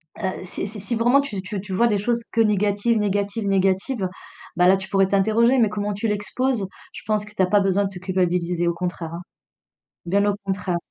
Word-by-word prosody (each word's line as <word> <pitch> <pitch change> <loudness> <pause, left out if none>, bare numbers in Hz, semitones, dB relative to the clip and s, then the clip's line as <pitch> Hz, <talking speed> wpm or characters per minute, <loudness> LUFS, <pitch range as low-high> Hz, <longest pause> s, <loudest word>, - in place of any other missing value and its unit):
heu, 190 -3 -4
si 185 - -4
si 210 +1 -8
si 220 +5 -3
vraiment 240 +5 +4
tu 210 -9 -5
tu 195 +1 -5
tu 195 -1 -7
vois 235 +6 +3
des 210 -3 +1
choses 235 +4 0
que 230 - +2
négatives, 210 +1 +2
négatives, 205 +1 -1
négatives, 195 +3 +1 0.5
bah 180 +1 +4
là, 190 - +6
tu 190 0 -8
pourrais 195 -1 +3
t'interroger, 220 +6 +3
mais 225 -3 +4
comment 205 0 -2
tu 205 +3 -2
l'exposes, 215 +2 -1 0.3
je - - -8
pense 215 -1 0
que 210 - -14
t'as 190 - +3
pas 205 +3 +3
besoin 195 0 +2
de - - -2
te 190 -2 -9
culpabiliser, 180 -2 0
au 170 - +2
contraire, 170 -2 -4
hein. 170 - -6 0.8
Bien 200 +4 +2
au 205 -1 +1
contraire. 190 -2 -1
200 Hz, 215 wpm, -23 LUFS, 190-215 Hz, 0.8 s, là